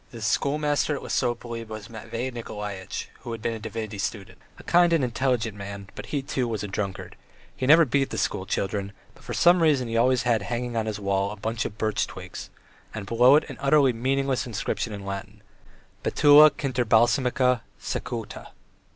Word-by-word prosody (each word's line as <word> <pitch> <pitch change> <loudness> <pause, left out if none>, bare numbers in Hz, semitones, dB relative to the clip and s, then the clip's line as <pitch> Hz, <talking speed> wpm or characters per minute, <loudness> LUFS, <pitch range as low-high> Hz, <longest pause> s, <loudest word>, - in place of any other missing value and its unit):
The 115 - -10
schoolmaster 145 +6 0
at - - -7
Lesopolye 120 -2 -2
was 110 -1 -8
Matvey 115 +2 -5
Nikolaitch, 105 -5 -6
who 120 -1 -6
had 115 - -5
been 115 - 0
a 115 - -6
divinity 110 -1 -5
student, 100 -1 -5 0.2
a - - -13
kind 175 0 +4
and 160 -5 +3
intelligent 120 -3 0
man, 100 -1 -8
but - - -8
he, 140 -2 -2
too, 130 -2 -1
was 110 -3 -3
a - - -3
drunkard; 95 -1 -4 0.4
he 130 - -2
never 165 +3 +7
beat 135 +1 +1
the - - -5
schoolchildren, 100 +1 -2 0.2
but - - -20
for - - -5
some 175 0 +5
reason 145 -6 +3
he 115 - -4
always 125 +2 +3
had 115 -3 +2
hanging 120 +2 -3
on 110 -1 -1
his 105 -1 -3
wall 100 0 0
a 105 - -6
bunch 110 +2 -3
of 105 - -6
birch 110 0 0
twigs, - - -9 0.5
and 105 -2 -5
below 120 +5 +5
it 150 - +2
an 135 -5 -8
utterly 140 -2 +4
meaningless 135 +2 0
inscription 115 0 -3
in 100 -1 -7
Latin: 100 +1 -7 0.6
"Betula 150 +1 +7
kinderbalsamica 125 -1 +2 0.2
secuta." - - -5
115 Hz, 180 wpm, -25 LUFS, 105-135 Hz, 0.6 s, never